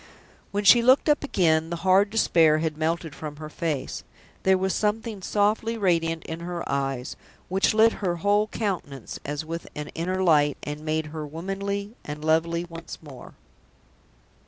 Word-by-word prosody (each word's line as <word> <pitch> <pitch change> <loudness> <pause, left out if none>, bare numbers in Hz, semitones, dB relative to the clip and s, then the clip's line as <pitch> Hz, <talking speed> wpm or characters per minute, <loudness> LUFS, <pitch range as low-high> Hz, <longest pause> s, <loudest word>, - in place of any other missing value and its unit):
When 205 +1 -2
she 235 +4 +8
looked 255 +6 +5
up 295 0 +3
again, 165 - +2
the 170 - -2
hard 195 +2 +5
despair 165 -8 +4
had 155 -1 -1
melted 160 0 -2
from 150 -2 -7
her 155 0 -8
face. 155 -6 -3 0.4
There 190 0 +4
was 190 0 0
something 215 -1 -1
softly 215 +4 +1
radiant 165 -5 +1
in 160 +1 -6
her 170 0 -5
eyes, 135 -2 -2 0.3
which 190 +3 +2
lit 225 +1 +6
her 180 -3 0
whole 205 +4 +2
countenance 175 - -4
as 145 +2 -4
with 165 +1 -5
an 150 0 -5
inner 185 +3 -2
light, 145 -4 +4
and 150 +1 -5
made 155 0 -1
her 155 -1 -4
womanly 200 +6 -4
and 150 +1 -6
lovely 165 +2 +1
once 165 -1 -9
more. 135 -5 -12
170 Hz, 160 wpm, -25 LUFS, 155-200 Hz, 0.4 s, she